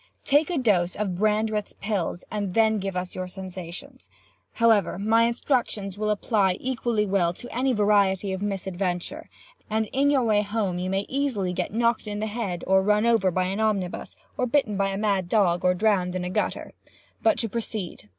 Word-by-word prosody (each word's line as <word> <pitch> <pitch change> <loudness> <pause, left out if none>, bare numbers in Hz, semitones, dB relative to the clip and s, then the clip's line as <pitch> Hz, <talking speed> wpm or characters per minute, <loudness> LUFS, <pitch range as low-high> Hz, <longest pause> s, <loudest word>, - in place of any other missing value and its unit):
Take 290 +3 +3
a 350 - -1
dose 185 -9 +2
of 200 -4 -2
Brandreth's 215 +1 0
pills, 200 -4 -3
and 205 -4 -3
then 220 -1 +3
give 195 -1 -4
us 180 0 -4
your 185 0 -4
sensations. 185 -2 -9 0.4
However, 225 -7 +3
my 225 +3 +3
instructions 235 -5 -1
will 215 +1 -2
apply 200 -3 +1
equally 240 -4 -1
well 190 -4 +1
to 245 +7 -10
any 260 +2 +1
variety 200 -3 +2
of 190 - -4
misadventure, 195 - -3 0.4
and 220 +1 +1
in 280 +2 +3
your 275 -3 +3
way 215 -3 +3
home 200 -3 -2
you 185 +1 -2
may 195 +1 -1
easily 255 -10 -1
get 180 0 -2
knocked 230 0 +1
in 205 0 -3
the 215 - -1
head, 205 -6 -3
or 190 0 +4
run 210 +2 +2
over 225 -5 +3
by 185 +1 0
an 190 +3 -2
omnibus, 205 -5 -1 0.2
or 250 - +1
bitten 235 -5 +1
by 195 0 +1
a 195 0 -2
mad 200 -4 0
dog, 180 -5 +2
or 180 0 +3
drowned 185 -3 +1
in 185 - -2
a 180 - -3
gutter. - - -2 0.5
But 330 - +3
to 230 - 0
proceed. 215 - -5
205 Hz, 190 wpm, -25 LUFS, 185-225 Hz, 0.5 s, or